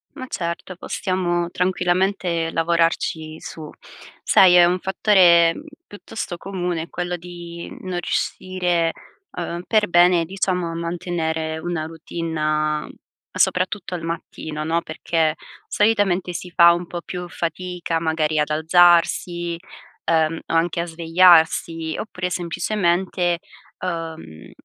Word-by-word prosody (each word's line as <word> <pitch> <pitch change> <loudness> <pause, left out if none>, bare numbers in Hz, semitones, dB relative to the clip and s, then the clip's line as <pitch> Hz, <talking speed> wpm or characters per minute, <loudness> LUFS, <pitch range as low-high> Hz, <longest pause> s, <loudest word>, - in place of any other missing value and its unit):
Ma 260 - -6
certo, 170 0 -4
possiamo 175 -2 -2
tranquillamente 180 -2 0
lavorarci 165 -1 0
su. 155 -2 -9 0.5
Sai, 180 -2 +6
è 175 -1 +8
un 180 +1 +1
fattore 180 -4 +5 0.3
piuttosto 205 -2 -6
comune 175 -3 -4
quello 180 0 -3
di 170 -1 -9
non 185 -1 -5
riuscire, 180 -4 -1 0.4
uhm, 175 0 -5
per 215 -2 +2
bene 175 -1 +4
diciamo 185 -1 -1
a - - -6
mantenere 165 -2 -3
una 170 -2 -3
routine 165 0 -5
a 155 0 0 0.5
soprattutto 185 +1 0
al 170 - -5
mattino, 160 -2 -5
no? 165 +1 +1
Perché 160 0 -1 0.3
solitamente 205 -4 +1
si 180 +1 -6
fa 170 -1 +7
un 175 0 -4
po' 175 - -5
più 180 0 -6
fatica, 175 0 -3
magari 160 -1 0
ad 150 0 +1
alzarsi, 175 +1 +3 0.6
uhm, 160 0 +2
o - - -4
anche 170 +1 +1
a - - -3
svegliarsi, 165 -1 +3
oppure 185 -4 -4
semplicemente, 175 0 0 0.4
uhm, 165 - -6
170 Hz, 115 wpm, -22 LUFS, 165-180 Hz, 0.6 s, è